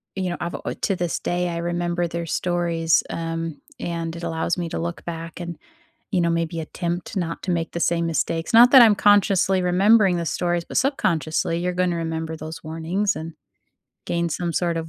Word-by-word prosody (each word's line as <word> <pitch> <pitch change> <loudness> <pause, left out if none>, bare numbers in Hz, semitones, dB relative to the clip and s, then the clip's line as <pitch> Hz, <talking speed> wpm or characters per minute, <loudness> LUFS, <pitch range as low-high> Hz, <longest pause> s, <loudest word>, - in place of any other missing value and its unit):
you 190 -1 -2
know, 175 - -3
I've 170 0 -3
al - - -8 0.2
to 195 - +1
this 175 -2 -1
day, 175 0 -1
I 170 - -3
remember 175 0 -1
their 170 0 -4
stories, 170 -1 +1
um, 165 -1 -4 0.2
and 165 -1 -3
it 170 - -8
allows 165 +1 -1
me 175 -1 -2
to - - -4
look 170 0 -5
back 165 0 -6
and, 175 -1 -5 0.6
you 185 - +2
know, 170 -1 +2
maybe 165 0 -1
attempt 170 +4 -4
not 170 -3 -3
to 185 - -1
make 165 -1 -1
the 170 - -4
same 170 0 +1
mistakes. 165 0 -1
Not 240 +2 +8
that 265 - +10
I'm 220 -3 +7
consciously 195 -2 +4
remembering 190 +1 +4
the 170 - -2
stories, 175 +1 -1
but - - -9
subconsciously, 165 - 0
you're 180 +1 -1
gonna 180 -1 +1
remember 160 -1 -3
those 155 +1 -8
warnings 165 +6 -1
and 160 0 -6 0.7
gain 170 0 -1
some 170 +1 -2
sort 170 -2 0
of 165 0 -5
170 Hz, 200 wpm, -23 LUFS, 165-180 Hz, 0.7 s, that